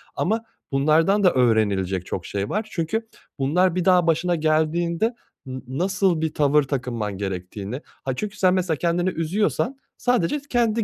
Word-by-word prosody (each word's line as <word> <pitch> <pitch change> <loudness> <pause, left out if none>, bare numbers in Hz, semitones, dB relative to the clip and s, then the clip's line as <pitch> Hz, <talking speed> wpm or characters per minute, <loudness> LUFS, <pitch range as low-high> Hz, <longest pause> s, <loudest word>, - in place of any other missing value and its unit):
ama 220 +4 0 0.3
bunlardan 160 +9 +3
da 180 - +5
öğrenilecek 100 -7 +2
çok 90 - -4
şey 100 0 -3
var 215 +1 -2
çünkü 205 +7 -2 0.3
bunlar 170 +6 +2
bir 180 -2 0
daha 180 -2 +4
başına 170 +2 +2
geldiğinde 165 +7 +1 0.3
n 130 0 -6
nasıl 180 +4 +1
bir 160 -1 -1
tavır 150 0 +3
takınman 120 -7 -3
gerektiğini, 95 +5 -5 0.2
aaa, 130 -1 -1
çünkü 210 +7 -5
sen 185 -1 +4
mesela 180 -4 0
kendini 175 +3 +1
üzüyorsan 200 - -1 0.2
sadece 245 +1 +1
kendi 230 -2 +2
165 Hz, 150 wpm, -23 LUFS, 130-185 Hz, 0.3 s, da